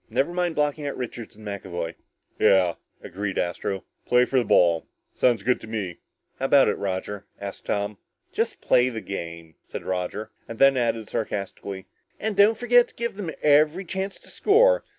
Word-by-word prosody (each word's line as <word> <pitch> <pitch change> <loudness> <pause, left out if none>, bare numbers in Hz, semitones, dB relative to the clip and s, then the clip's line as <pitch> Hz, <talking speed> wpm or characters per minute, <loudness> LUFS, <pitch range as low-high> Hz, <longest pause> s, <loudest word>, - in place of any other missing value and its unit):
"Never 135 +9 0
mind 175 -2 0
blocking 150 0 0
out 140 - -4
Richards 120 -3 -6
and 110 0 -14
McAvoy." 95 -4 -4 0.5
"Yeah," 90 -3 +5 0.3
agreed 100 +2 -4
Astro, 90 +2 -2 0.2
"play 125 0 +5
for 130 - +2
the - - +1
ball. 85 -4 +4 0.3
Sounds 120 -5 +2
good 125 +3 +1
to - - -9
me." 105 -6 -4 0.4
"How 135 - -1
about 135 0 +6
it, - - -1
Roger?" 100 +1 -4
asked 100 -1 -7
Tom. 100 0 -2 0.3
"Just - - -2
play 125 +1 +4
the 115 -3 -5
game," 85 -3 -7
said - - -8
Roger. 95 +4 -3 0.2
And 115 - -7
then 135 +1 +6
added 115 -3 0
sarcastically, 100 -2 -4 0.3
"And 215 -1 -2
don't 205 +3 +5
forget 245 0 +5
to - - -21
give 235 0 -2
them 195 -5 -4
every 150 +5 +4
chance 190 +2 -4
to - - -13
score. - - +4
115 Hz, 175 wpm, -25 LUFS, 95-150 Hz, 0.5 s, about